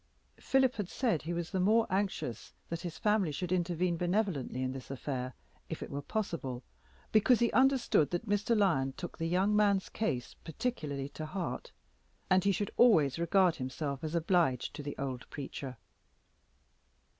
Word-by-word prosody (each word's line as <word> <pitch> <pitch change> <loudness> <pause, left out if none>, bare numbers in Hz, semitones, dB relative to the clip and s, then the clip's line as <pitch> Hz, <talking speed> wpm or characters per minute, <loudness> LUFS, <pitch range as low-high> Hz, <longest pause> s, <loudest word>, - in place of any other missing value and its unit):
Philip 265 -2 +2
had 205 -4 -3
said 230 - 0
he 165 - -4
was 175 -1 -3
the 190 - 0
more 220 +5 +4
anxious 190 - -2 0.2
that 170 0 -3
his 170 -3 -6
family 210 -5 +2
should 175 +5 -4
intervene 175 -1 +1
benevolently 175 - 0
in 130 - -1
this 130 -1 -8
affair, 130 -2 -4 0.3
if - - -4
it - - -8
were 140 - -3
possible, 140 - -3 0.5
because 220 +3 +5
he 235 -1 +2
understood 260 - +3
that 175 +6 -3
Mr. 205 +3 +2
Lyon 150 -10 +2
took 175 - -7
the 165 - 0
young 190 +5 +2
man's 200 -2 +3
case 135 - -2
particularly 150 - -3
to 155 +1 -6
heart, 180 +1 -4 0.6
and 185 -1 +5
he 200 - +5
should 200 +2 -2
always 165 - +5
regard 175 +1 +3
himself 135 +2 -4
as 155 +1 -3
obliged 165 -6 +2
to 145 - -6
the 145 0 -6
old 130 -2 -4
preacher. 135 -2 -6
175 Hz, 165 wpm, -32 LUFS, 140-205 Hz, 0.6 s, because